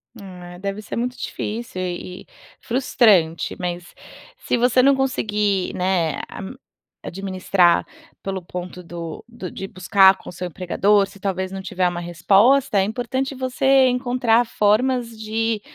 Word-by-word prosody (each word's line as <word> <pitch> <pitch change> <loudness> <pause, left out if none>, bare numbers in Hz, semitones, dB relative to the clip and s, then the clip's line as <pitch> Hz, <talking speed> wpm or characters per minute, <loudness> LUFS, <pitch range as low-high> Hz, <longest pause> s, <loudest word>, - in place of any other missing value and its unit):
Ah, 180 -4 -10
é - - -12
deve 200 +2 -4
ser - - -7
muito 250 +2 -2
difícil 225 -2 -5
e 180 -1 -2 0.2
e - - -14 0.4
frustrante, 225 -10 +2
mas 175 -1 -5 0.4
se - - -1
você 250 +1 +4
não 275 +2 +5
conseguir, 210 -7 0
né, 180 -3 0
a - - -8 0.6
administrar 185 -1 +1 0.4
pelo 195 -1 -3
ponto 180 +1 -7
do 170 -1 -7
do 230 -7 -8
de 195 - -6
buscar 190 +1 +4
com - - -11
o - - -7
seu 180 +1 -5
empregador. 195 +4 +1
Se 200 - -16
talvez 190 -1 -2
não 195 0 -5
tiver 185 -1 -1
uma 175 -1 -3
resposta, 200 +8 +3
é - - +3
importante 255 +6 -3
você 260 +1 +3
encontrar 245 -2 +2
formas 235 +3 +1
de 220 0 -1
200 Hz, 150 wpm, -21 LUFS, 180-240 Hz, 0.6 s, não